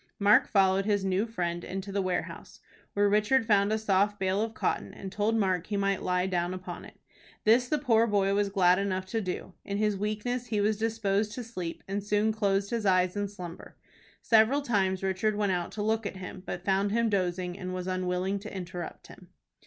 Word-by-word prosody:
Mark 205 Hz, +1 st, +5 dB
followed 195 Hz, -1 st, +3 dB
his 205 Hz, -2 st, +1 dB
new 190 Hz, +4 st, +1 dB
friend 175 Hz, -6 st, -3 dB
into 195 Hz, +1 st, -5 dB
the 200 Hz, 0 st, 0 dB
warehouse, 185 Hz, -1 st, -4 dB, 0.3 s
where 205 Hz, 0 st, +3 dB
Richard 215 Hz, +5 st, +3 dB
found 205 Hz, -2 st, +3 dB
a 220 Hz, -, +2 dB
soft 205 Hz, -1 st, +1 dB
bale 190 Hz, +1 st, 0 dB
of 225 Hz, 0 st, -3 dB
cotton, -, -, -2 dB
and 190 Hz, -, -7 dB
told 210 Hz, +3 st, 0 dB
Mark 185 Hz, -5 st, +1 dB
he 205 Hz, -, -2 dB
might 195 Hz, -1 st, 0 dB
lie 180 Hz, 0 st, 0 dB
down 180 Hz, -1 st, -1 dB
upon 185 Hz, 0 st, -7 dB
it. -, -, -14 dB, 0.5 s
This 235 Hz, +3 st, +4 dB
the 300 Hz, -, +1 dB
poor 230 Hz, -5 st, +3 dB
boy 200 Hz, -2 st, +2 dB
was 200 Hz, 0 st, +1 dB
glad 185 Hz, -2 st, +4 dB
enough 190 Hz, -1 st, -1 dB
to 225 Hz, +4 st, -2 dB
do. 185 Hz, -1 st, -5 dB
In 200 Hz, -, -3 dB
his 210 Hz, -1 st, +1 dB
weakness 215 Hz, +5 st, -2 dB
he 215 Hz, -2 st, -1 dB
was 210 Hz, +1 st, +1 dB
disposed 215 Hz, -2 st, 0 dB
to 250 Hz, -, -5 dB
sleep, 180 Hz, -8 st, -6 dB
and 200 Hz, +1 st, -3 dB
soon 210 Hz, +1 st, +2 dB
closed 200 Hz, -2 st, 0 dB
his 230 Hz, -2 st, -1 dB
eyes 185 Hz, 0 st, +3 dB
in 205 Hz, 0 st, -1 dB
slumber. 180 Hz, -4 st, -10 dB, 0.5 s
Several 230 Hz, +6 st, +4 dB
times 195 Hz, -6 st, 0 dB
Richard 195 Hz, +3 st, 0 dB
went 205 Hz, -2 st, +1 dB
out 175 Hz, -2 st, -2 dB
to 205 Hz, -, -3 dB
look 220 Hz, 0 st, 0 dB
at 195 Hz, -, -7 dB
him, 185 Hz, 0 st, -8 dB
but 175 Hz, +1 st, -5 dB
found 195 Hz, +1 st, +2 dB
him 230 Hz, +1 st, +2 dB
dozing, 180 Hz, -3 st, -1 dB
and 185 Hz, -1 st, -5 dB
was 185 Hz, -1 st, -4 dB
unwilling 185 Hz, +1 st, -1 dB
to 210 Hz, +2 st, -9 dB
interrupt 180 Hz, -3 st, -7 dB
him. -, -, -14 dB
200 Hz, 210 wpm, -29 LUFS, 185-215 Hz, 0.5 s, Mark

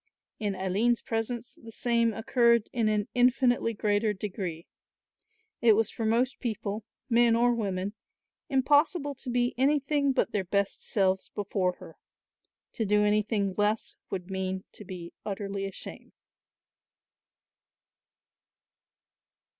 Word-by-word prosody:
In 205 Hz, -2 st, -1 dB
Aline's 200 Hz, +6 st, +1 dB
presence 235 Hz, +2 st, -4 dB
the 225 Hz, -, -10 dB
same 235 Hz, 0 st, +2 dB
occurred 235 Hz, 0 st, +2 dB
in 230 Hz, -3 st, +2 dB
an 210 Hz, -1 st, 0 dB
infinitely 245 Hz, -2 st, +3 dB
greater 210 Hz, +1 st, +1 dB
degree. 185 Hz, -4 st, -5 dB, 1.0 s
It 230 Hz, -2 st, +7 dB
was 220 Hz, 0 st, +1 dB
for 225 Hz, -, -3 dB
most 245 Hz, +5 st, +1 dB
people, 215 Hz, -3 st, -3 dB, 0.2 s
men 235 Hz, -1 st, +4 dB
or 240 Hz, +1 st, +4 dB
women, 200 Hz, -3 st, -2 dB, 0.6 s
impossible 290 Hz, +2 st, +3 dB
to 265 Hz, -1 st, -8 dB
be 245 Hz, 0 st, +1 dB
anything 280 Hz, +1 st, +2 dB
but -, -, +1 dB
their 205 Hz, -, 0 dB
best 200 Hz, +2 st, -1 dB
selves 190 Hz, -2 st, +1 dB
before 190 Hz, -2 st, -1 dB
her; 175 Hz, -3 st, -14 dB, 0.7 s
to 225 Hz, -, -2 dB
do 210 Hz, 0 st, +3 dB
anything 210 Hz, -1 st, +1 dB
less 210 Hz, +1 st, 0 dB
would 185 Hz, 0 st, -5 dB
mean 190 Hz, 0 st, -2 dB
to -, -, -11 dB
be 180 Hz, -3 st, -8 dB
utterly 195 Hz, -1 st, -3 dB
ashamed. 195 Hz, -, -8 dB
215 Hz, 120 wpm, -28 LUFS, 195-240 Hz, 1.0 s, It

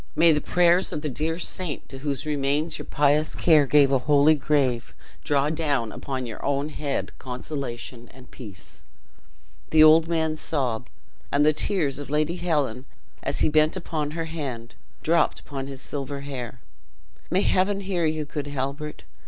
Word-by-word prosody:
May 165 Hz, +1 st, +6 dB
the 150 Hz, -1 st, +2 dB
prayers 175 Hz, +3 st, +3 dB
of 150 Hz, -, -3 dB
the 150 Hz, -, -1 dB
dear 155 Hz, +5 st, -2 dB
saint, 175 Hz, -3 st, -1 dB
to 135 Hz, -, -9 dB
whose 140 Hz, -1 st, -3 dB
remains 145 Hz, +2 st, -1 dB
your -, -, -8 dB
pious 150 Hz, +1 st, +2 dB
care 155 Hz, -4 st, +4 dB
gave 140 Hz, -1 st, +5 dB
a 135 Hz, -, +3 dB
holy 145 Hz, +3 st, +5 dB
grave, 135 Hz, -5 st, 0 dB, 0.3 s
draw 145 Hz, +1 st, +1 dB
down 145 Hz, -8 st, -1 dB
upon 130 Hz, -2 st, -4 dB
your 115 Hz, -2 st, -8 dB
own 140 Hz, +1 st, 0 dB
head 145 Hz, -2 st, -3 dB
consolation 125 Hz, -2 st, -6 dB
and 130 Hz, -1 st, -16 dB
peace!" 100 Hz, -7 st, -10 dB, 0.9 s
The 155 Hz, -1 st, +6 dB
old 160 Hz, +1 st, +7 dB
man 160 Hz, -2 st, 0 dB
sobbed; 125 Hz, -7 st, -2 dB, 0.4 s
and 145 Hz, +1 st, +3 dB
the 155 Hz, -, +5 dB
tears 150 Hz, -4 st, +1 dB
of 145 Hz, -, -7 dB
Lady 155 Hz, +4 st, 0 dB
Helen, 145 Hz, -8 st, -1 dB, 0.4 s
as -, -, -3 dB
he -, -, +4 dB
bent 155 Hz, +3 st, +3 dB
upon 155 Hz, -4 st, -3 dB
her 165 Hz, -, -2 dB
hand, 135 Hz, -8 st, -6 dB, 0.3 s
dropped 170 Hz, +2 st, +2 dB
upon 135 Hz, -2 st, -6 dB
his 135 Hz, -1 st, -7 dB
silver 140 Hz, -1 st, -5 dB
hair. 125 Hz, -3 st, -6 dB, 0.7 s
"May 185 Hz, +3 st, +2 dB
Heaven 195 Hz, +1 st, +1 dB
hear 185 Hz, -4 st, 0 dB
you, 155 Hz, -1 st, -2 dB
good 145 Hz, -1 st, -5 dB
Halbert! 145 Hz, +2 st, -4 dB
145 Hz, 165 wpm, -25 LUFS, 135-160 Hz, 0.9 s, old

